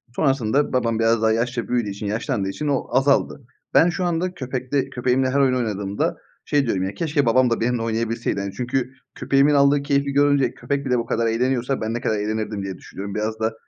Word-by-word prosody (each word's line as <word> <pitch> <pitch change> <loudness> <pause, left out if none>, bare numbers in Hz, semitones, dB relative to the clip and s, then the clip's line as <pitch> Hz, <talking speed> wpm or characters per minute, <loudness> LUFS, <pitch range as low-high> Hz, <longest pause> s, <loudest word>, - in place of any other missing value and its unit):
Sonrasında 135 -1 +1
babam 115 -3 +1
biraz 115 0 +2
daha 110 0 +3
yaşça 120 -1 -1
büyüdüğü 120 -4 0
için 100 +1 -6
yaşlandığı 105 -1 -2
için 150 +9 -4
o 140 -2 0
azaldı. 140 0 +2 0.3
Ben 175 - +6
şu 180 +1 -2
anda 175 +2 -1
köpekte 130 0 -2
köpeğimle 130 +1 +1
her 140 +2 +1
oyun 130 -2 +3
oynadığımda 105 -4 -2 0.3
şey 145 -2 +1
diyorum 95 -4 0
ya 95 - -3
keşke 150 -4 0
babam 125 +1 +4
da 115 - 0
benimle 120 0 0
oynayabilseydi 115 -1 -1
hani 100 -1 -5
çünkü 125 +1 -2 0.2
köpeğimin 140 +2 +3
aldığı 140 0 +4
keyfi 140 -1 0
görünce 145 -1 +3
köpek 140 0 -3
bile 125 -1 +1
bu 115 - -2
kadar 115 0 0
eğleniyorsa 125 +3 0
ben 110 +1 -2
ne 120 - -3
kadar 110 - 0
eğlenirdim 105 -1 -3
diye 95 -2 -5
düşünüyorum. 100 +1 -8
Biraz 110 +1 -2
da, 110 0 0
125 Hz, 200 wpm, -22 LUFS, 110-140 Hz, 0.3 s, Ben